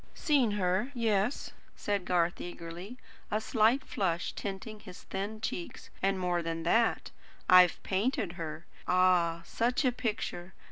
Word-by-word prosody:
"Seen 270 -9 +2
her? 190 +5 0
Yes," 225 +1 0 0.2
said 200 -3 -2
Garth 175 -1 +1
eagerly, 175 +6 -7 0.3
a 210 - +1
slight 225 +4 +2
flush 175 -4 -1
tinting 205 +2 -6
his 185 -4 -12
thin 200 +3 -4
cheeks, 180 -5 -5
"and 195 0 +2
more 180 -2 0
than 165 0 -3
that, 225 +7 +2 0.4
I've 180 -1 +6
painted 200 -1 0
her. 165 -1 -6 0.2
Ah, 180 -2 +3
such 245 - 0
a 255 - +4
picture! 210 -7 -4
190 Hz, 135 wpm, -31 LUFS, 175-220 Hz, 0.4 s, I've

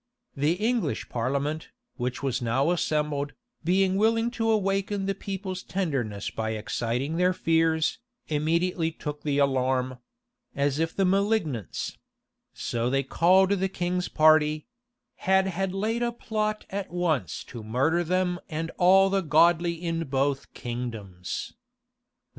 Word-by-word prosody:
The 145 +4 +2
English 225 +5 -1
parliament, 140 +6 -2 0.3
which 125 +1 -3
was 130 -2 0
now 130 +7 +2
assembled, 150 -4 0 0.3
being 190 +2 +2
willing 225 +2 +2
to 225 -2 -1
awaken 195 -1 +1
the 195 - 0
people's 195 -1 -5
tenderness 130 - -2
by 110 0 -2
exciting 120 +7 -2
their 180 +1 +3
fears, 160 -2 +1 0.3
immediately 165 +2 +1
took 150 -2 -6
the 145 -2 0
alarm; 130 -2 +1 0.6
as 140 +1 +1
if 165 0 -1
the 195 - +2
malignants 190 - 0 0.5
so 120 +1 -2
they 135 +1 +1
called 185 +7 +4
the 190 -1 +1
king's 180 0 -1
party 155 -1 +4 0.5
had 190 0 +3
had 190 0 -1
laid 215 +5 -1
a 240 0 +1
plot 215 -2 -2
at 195 -1 -3
once 165 - -1
to 120 - -9
murder 135 +10 +1
them 180 +1 0
and 165 0 -3
all 190 +2 +6
the 195 0 +2
godly 170 +1 +4
in 165 -1 -2
both 135 0 -1
kingdoms. 115 -7 -5
165 Hz, 130 wpm, -27 LUFS, 135-190 Hz, 0.6 s, all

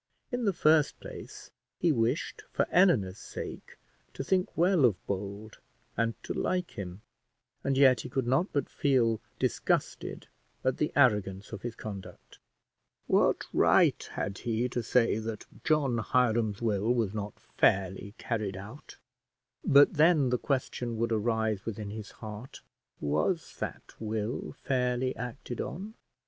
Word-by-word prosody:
In 245 -1 -1
the 200 - +4
first 155 -4 +3
place, - - -10 0.3
he 170 - +3
wished 120 +2 0
for - - +1
Eleanor's 120 - +4
sake - - -8 0.4
to - - -3
think 185 +5 0
well 175 -2 +4
of 115 -6 +5
Bold 100 +2 -5 0.4
and 115 0 0
to - - -3
like 180 -1 -1
him, 95 -1 -7 0.6
and 135 -1 +1
yet 130 -2 +6
he - - -7
could 135 -2 -1
not 135 - +1
but 145 - 0
feel 120 -6 +2 0.2
disgusted - - -1 0.4
at 130 - +1
the 150 - 0
arrogance 105 -7 +2
of 110 -3 -6
his 120 0 -5
conduct. 100 -3 -9 0.7
What - - +3
right - - +4
had 100 - -3
he 120 0 0
to 120 - -2
say 115 -1 +2
that 110 -1 -5 0.2
John 140 -6 +2
Hiram's 115 -3 +1
will 110 0 +1
was 110 -5 0
not 105 -2 -5
fairly 95 +2 +1
carried 105 -5 -2
out? 110 +9 -10 0.7
But 140 +1 +6
then 150 -4 +4
the 125 - +1
question 125 -4 -2
would 115 +1 0
arise 110 -2 0
within 105 -2 -5
his 105 -1 -7
heart, 110 +4 -9 0.4
Was 80 - 0
that - - -6
will 110 +1 -3
fairly 125 -1 0
acted 120 0 -5
on? 200 +5 -6
115 Hz, 140 wpm, -30 LUFS, 105-135 Hz, 0.7 s, yet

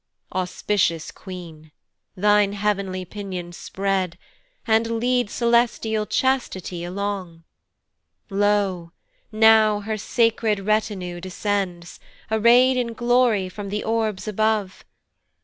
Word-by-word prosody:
Auspicious 180 -2 -1
queen, 165 -5 -10 0.5
thine 205 +1 +3
heav'nly 200 -3 -1
pinions 180 -3 -7
spread, 190 -3 -2 0.5
And 225 0 +2
lead 245 -2 +1
celestial 235 -2 +1
Chastity 190 -10 -1
along; 185 -2 -4 0.9
Lo! 195 -4 0 0.4
now 215 -1 +5
her 215 +1 -3
sacred 225 -2 +1
retinue 195 -4 -1
descends, 185 -2 -3 0.3
Array'd 240 +4 +5
in 235 -2 -1
glory 240 -4 +2
from 200 +2 -7
the 210 +1 -3
orbs 220 -3 -1
above. 215 -2 0
205 Hz, 95 wpm, -23 LUFS, 185-220 Hz, 0.9 s, now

